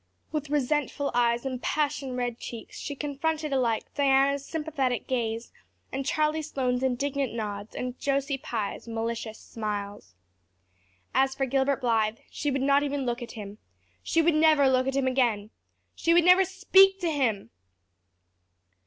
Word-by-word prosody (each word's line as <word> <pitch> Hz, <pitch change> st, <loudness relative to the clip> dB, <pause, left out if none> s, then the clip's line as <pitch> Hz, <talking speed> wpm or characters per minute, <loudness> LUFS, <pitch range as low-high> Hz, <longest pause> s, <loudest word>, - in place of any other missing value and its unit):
With 305 Hz, -2 st, -3 dB
resentful 290 Hz, 0 st, 0 dB
eyes 240 Hz, +1 st, +2 dB
and 255 Hz, -2 st, -3 dB
passion 290 Hz, -3 st, -1 dB
red 245 Hz, -1 st, -2 dB
cheeks 230 Hz, -2 st, -8 dB
she 285 Hz, -, -5 dB
confronted 300 Hz, +1 st, -2 dB
alike 235 Hz, -4 st, +1 dB
Diana's 275 Hz, 0 st, +3 dB
sympathetic 285 Hz, -5 st, -2 dB
gaze 230 Hz, -2 st, -2 dB, 0.4 s
and 270 Hz, +1 st, -2 dB
Charlie 305 Hz, +1 st, +1 dB
Sloane's 255 Hz, -5 st, -1 dB
indignant 265 Hz, 0 st, -1 dB
nods 205 Hz, -2 st, -5 dB
and 250 Hz, 0 st, -4 dB
Josie 275 Hz, 0 st, 0 dB
Pye's 220 Hz, -2 st, -4 dB
malicious 230 Hz, -1 st, -3 dB
smiles. 205 Hz, -, -6 dB, 1.0 s
As 270 Hz, 0 st, +2 dB
for 270 Hz, -, 0 dB
Gilbert 270 Hz, +1 st, +1 dB
Blythe, 225 Hz, -2 st, +1 dB
she 295 Hz, -, -2 dB
would 275 Hz, -1 st, -1 dB
not 280 Hz, +1 st, +4 dB
even 285 Hz, -1 st, -2 dB
look 240 Hz, 0 st, -2 dB
at 240 Hz, -, -7 dB
him. 210 Hz, -2 st, -8 dB, 0.4 s
She 330 Hz, -, +1 dB
would 335 Hz, +1 st, +4 dB
never 310 Hz, -2 st, +5 dB
look 260 Hz, 0 st, +2 dB
at 270 Hz, -, -1 dB
him 275 Hz, -1 st, +1 dB
again! 235 Hz, -5 st, +1 dB, 0.4 s
She 335 Hz, 0 st, +2 dB
would 345 Hz, -1 st, +5 dB
never 365 Hz, +1 st, +7 dB
speak 385 Hz, 0 st, +5 dB
to 340 Hz, -2 st, 0 dB
him!! 230 Hz, -, -1 dB
270 Hz, 150 wpm, -27 LUFS, 235-290 Hz, 1.0 s, never